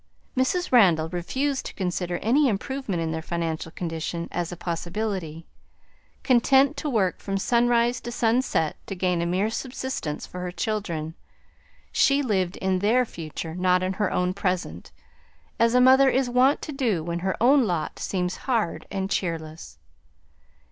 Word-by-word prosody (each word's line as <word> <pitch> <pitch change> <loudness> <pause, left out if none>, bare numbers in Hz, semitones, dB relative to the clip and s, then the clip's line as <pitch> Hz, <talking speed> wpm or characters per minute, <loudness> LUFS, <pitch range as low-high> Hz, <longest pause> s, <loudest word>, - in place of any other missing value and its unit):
Mrs. 310 +8 0
Randall 175 -10 +5
refused 265 - -2
to - - -10
consider 180 -2 -2
any 275 +6 +4
improvement 215 -4 -2
in 160 - -2
their 160 0 -3
financial 165 -1 -3
condition 170 0 -4
as 175 0 -3
a 175 - -7
possibility. 175 -1 -4 0.8
Content 265 +3 +4
to 295 - -2
work 205 -8 +1
from 195 -1 -3
sunrise 240 +2 +2
to 240 - -6
sunset 230 - +1
to 195 - -4
gain 180 -2 0
a 170 - -1
mere 190 +5 0
subsistence 250 - -4
for 180 - -9
her 180 0 -4
children, 175 -6 -3 0.8
she 280 +1 +3
lived 190 -7 0
in 190 -1 0
their 235 +6 +3
future, 160 -4 -7
not 180 +1 +2
in 185 +1 -1
her 205 0 -1
own 180 0 0
present, 180 - -3 0.7
as 230 +1 +3
a - - +6
mother 265 +2 +6
is 265 0 +1
wont 255 +3 +3
to 305 - -5
do 235 - 0
when 170 +1 -3
her 190 +1 -2
own 260 +2 +5
lot 175 -4 -2
seems 180 -2 -2
hard 230 -9 -1
and 195 -1 -3
cheerless. 160 - -4
190 Hz, 155 wpm, -25 LUFS, 170-245 Hz, 0.8 s, a